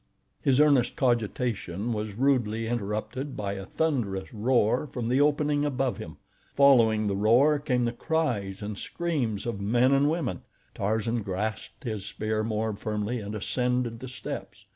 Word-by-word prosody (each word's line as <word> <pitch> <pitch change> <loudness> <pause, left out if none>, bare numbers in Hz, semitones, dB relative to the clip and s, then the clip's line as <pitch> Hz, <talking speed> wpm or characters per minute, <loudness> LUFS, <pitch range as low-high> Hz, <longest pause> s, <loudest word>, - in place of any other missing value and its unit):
His 135 -1 +3
earnest 140 -5 +4
cogitation 120 - -1
was 105 -1 -4
rudely 115 -3 +1
interrupted 115 +5 -3
by 100 -1 -2
a 95 -1 -7
thunderous 115 -13 -1
roar 120 +4 +2
from 125 -4 -4
the 130 +3 +3
opening 145 0 +2
above 135 -3 -1
him. - - -8 0.4
Following 115 -6 +5
the 100 -1 0
roar 125 +9 +4
came 125 -4 0
the 120 - 0
cries 120 - -1
and 105 -1 -5
screams 140 - -2
of 115 -4 -3
men 120 +6 +3
and 140 +1 +4
women. 155 - -2 0.3
Tarzan 110 +3 -1
grasped 105 +2 -4
his 110 -6 -3
spear 110 +1 -2
more 110 0 -1
firmly 105 +3 -2
and 105 0 -6
ascended 125 +2 -1
the 130 - -7
steps. 130 - -7
115 Hz, 150 wpm, -27 LUFS, 105-135 Hz, 0.4 s, Following